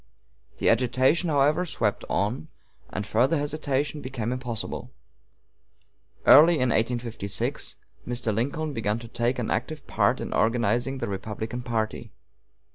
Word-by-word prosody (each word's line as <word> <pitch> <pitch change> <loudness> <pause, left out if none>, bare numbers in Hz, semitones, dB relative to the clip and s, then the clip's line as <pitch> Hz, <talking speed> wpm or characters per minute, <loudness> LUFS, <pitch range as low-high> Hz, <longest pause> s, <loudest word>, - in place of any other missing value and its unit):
The - - 0
agitation, 130 +8 +3
however, 150 +3 +3
swept 115 - -1
on, 115 +10 -1 0.4
and 105 - -4
further 130 +11 +2
hesitation 145 0 -1
became 125 -4 -3
impossible. 125 -3 -4 1.4
Early 165 +4 +8
in 130 -4 +1
1856 115 -3 -2 0.3
Mr. 120 -2 -1
Lincoln 145 +7 -2
began 110 -3 -1
to 115 0 -9
take 120 +2 -1
an 120 - -2
active 140 +5 -3
part - - +1
in - - -4
organizing 120 +3 +1
the - - -3
Republican 110 +4 -4
party. 115 -1 -3
125 Hz, 120 wpm, -26 LUFS, 115-140 Hz, 1.4 s, Early